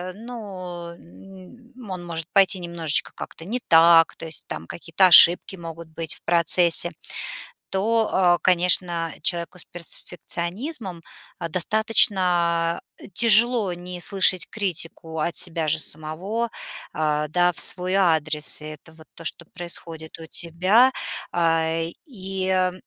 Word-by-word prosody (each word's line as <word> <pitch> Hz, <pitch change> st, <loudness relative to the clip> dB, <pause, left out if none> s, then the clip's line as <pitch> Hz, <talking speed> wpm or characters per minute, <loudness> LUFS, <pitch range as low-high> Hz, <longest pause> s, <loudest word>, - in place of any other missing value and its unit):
ну, 190 Hz, -7 st, -9 dB
м, 195 Hz, -, -16 dB
он 180 Hz, -2 st, -7 dB
может 165 Hz, -1 st, -5 dB
пойти 195 Hz, -1 st, +3 dB
немножечко 170 Hz, -3 st, -1 dB
как-то 160 Hz, -, -10 dB
не 240 Hz, +7 st, -3 dB
так, 165 Hz, 0 st, +5 dB
то -, -, -8 dB
есть 160 Hz, -1 st, -3 dB
там 80 Hz, -, -7 dB
какие-то 170 Hz, -, +1 dB
ошибки 180 Hz, +2 st, +7 dB
могут 165 Hz, -1 st, -10 dB
быть 160 Hz, -1 st, -4 dB
в -, -, -14 dB
процессе. 170 Hz, 0 st, +5 dB, 0.8 s
То, 220 Hz, +3 st, 0 dB
э, 175 Hz, -2 st, +2 dB
конечно, 175 Hz, -2 st, +2 dB
человеку 175 Hz, +1 st, -3 dB
с -, -, -6 dB
перфекционизмом 175 Hz, -, -6 dB, 0.4 s
достаточно 175 Hz, -2 st, +1 dB, 0.3 s
тяжело 230 Hz, -2 st, +3 dB
не 180 Hz, +1 st, -8 dB
слышать 185 Hz, -3 st, +4 dB
критику 165 Hz, -5 st, -4 dB
от 170 Hz, -, -3 dB
себя 165 Hz, -3 st, +2 dB
же 160 Hz, +1 st, +2 dB
самого, 180 Hz, +11 st, -3 dB, 0.4 s
а, 150 Hz, -1 st, -2 dB
да, 175 Hz, +3 st, +1 dB
в -, -, -12 dB
свой 180 Hz, +1 st, +2 dB
адрес. 155 Hz, -6 st, 0 dB
И -, -, -8 dB
это 155 Hz, +1 st, -12 dB
вот 160 Hz, 0 st, -17 dB
то, 165 Hz, -, -13 dB
что 165 Hz, +1 st, -4 dB
происходит 165 Hz, -2 st, -6 dB
у 160 Hz, -, -10 dB
тебя. 185 Hz, +11 st, +2 dB, 0.4 s
Э, 165 Hz, -1 st, 0 dB, 0.2 s
и 190 Hz, -, -2 dB
175 Hz, 125 wpm, -22 LUFS, 165-190 Hz, 0.8 s, ошибки